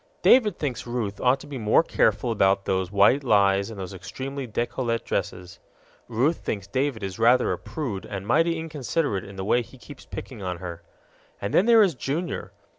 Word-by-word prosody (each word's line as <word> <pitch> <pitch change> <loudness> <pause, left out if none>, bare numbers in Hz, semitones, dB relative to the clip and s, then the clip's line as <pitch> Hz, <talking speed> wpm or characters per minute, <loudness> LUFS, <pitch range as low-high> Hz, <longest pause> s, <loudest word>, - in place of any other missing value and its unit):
David 225 -5 +5
thinks 130 -5 -4
Ruth 115 -4 -3
ought 130 +2 +3
to - - -10
be 145 -3 -6
more 110 +8 +4
careful 115 -6 +1
about 100 -2 +2
those 95 -1 -1
white 105 +8 +4
lies 100 -3 +3
and 110 -3 -8
those 95 0 -6
extremely 135 +8 -6
décolleté 120 +1 -2
dresses; 90 -1 -4 0.5
Ruth 130 +8 +1
thinks 100 -3 -4
David 130 +1 -2
is 95 +2 -5
rather 120 +2 +4
a - - -1
prude 120 -12 -5
and 100 -1 -6
mighty 165 +7 +2
inconsiderate 150 - -2
in 100 - -11
the 95 0 -5
way 120 +4 +3
he 125 +3 -13
keeps 115 - -13
picking - - -8
on 90 -2 -3
her. 85 -1 -7 0.6
And 100 - -4
then 195 - +4
there 230 -2 +7
is 190 -4 +2
Junior. 150 +6 -4
115 Hz, 190 wpm, -25 LUFS, 100-140 Hz, 0.6 s, there